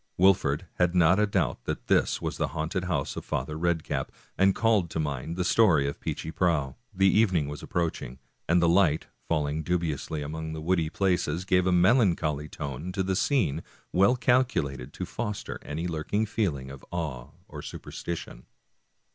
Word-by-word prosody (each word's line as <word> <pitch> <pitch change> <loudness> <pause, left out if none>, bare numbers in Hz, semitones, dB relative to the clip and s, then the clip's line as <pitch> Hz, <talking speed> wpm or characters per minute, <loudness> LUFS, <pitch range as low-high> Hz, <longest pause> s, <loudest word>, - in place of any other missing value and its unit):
Wolfert 90 -6 +3 0.2
had 90 0 +2
not 90 +2 +5
a 105 - +3
doubt - - -1
that - - -4
this - - +2
was - - -4
the - - 0
haunted 90 +4 -2
house 90 -3 -1
of - - -5
Father 75 +4 -3
Red 85 0 0
cap, - - -3 0.2
and 95 0 +4
called 110 -6 +2
to 80 - -3
mind 75 +1 -3
the 90 - +1
story 85 -10 +4
of 70 - -4
Peechy 80 - -4
Prauw. 80 -7 +1 0.2
The 95 -1 +2
evening 95 -7 +3
was 75 0 -6
approaching, 80 -7 -3 0.3
and 85 +2 +5
the - - +5
light, 85 -3 +3 0.2
fall 75 -3 +1
ing 75 +2 -2
dubiously 80 -3 -2
among 80 +2 -5
the 80 - -5
woody 85 -1 +1
places, 90 -2 0
gave 90 -1 +3
a - - +3
melancholy 85 - +3
tone 70 +4 -5
to 95 - 0
the 95 0 0
scene 100 - +1 0.3
well 100 +7 +5
calculated 120 - +1
to - - -4
foster 105 -1 -4
any 80 +4 -4
lurking 85 +6 -1
feel 105 -8 0
ing 65 0 -9
of 70 -1 -11
awe 75 -8 -4 0.2
or - - -8
superstition. 80 -7 -7
85 Hz, 180 wpm, -27 LUFS, 75-95 Hz, 0.3 s, not